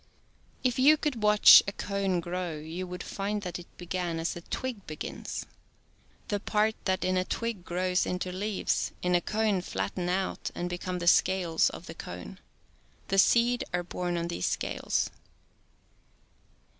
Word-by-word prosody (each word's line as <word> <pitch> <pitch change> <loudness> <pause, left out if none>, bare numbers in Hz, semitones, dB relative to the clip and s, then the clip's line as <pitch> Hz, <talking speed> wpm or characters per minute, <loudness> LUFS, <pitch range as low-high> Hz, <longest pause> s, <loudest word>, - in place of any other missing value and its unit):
If 250 -1 +1
you 295 +4 +7
could 280 -7 -2
watch 210 0 +9
a - - 0
cone 195 -3 -1
grow 175 -1 -3
you 165 +4 -6
would 180 0 -6
find 205 +1 -3
that 180 -2 -4
it 175 - -11
began 175 -1 -3
as 165 - -2
a 175 - -7
twig 240 +2 -5
be 155 - -5
gins. - - -5 0.8
The 205 - 0
parts 215 +1 +1
that 185 -1 0
in 185 0 +1
a 185 - +2
twig 230 -1 -3
grow 180 +1 -2
into 180 0 -2
leaves, 200 +2 -1
in 180 0 +1
a 175 - +4
cone 215 -2 0
flatten 175 - -3
out 190 +1 -1
and 175 0 -3
be 175 - -3
shedih^cnified). - - -27
come 185 -1 -3
the 175 -1 -4
scales 175 -2 +4
of - - -9
the - - -8
cone. - - -8 0.7
The 195 - +3
seed 240 +4 +4
are 175 - -1
borne 175 0 -3
on 170 0 -2
these 170 - -1
scales. - - -1
185 Hz, 170 wpm, -29 LUFS, 175-205 Hz, 0.8 s, watch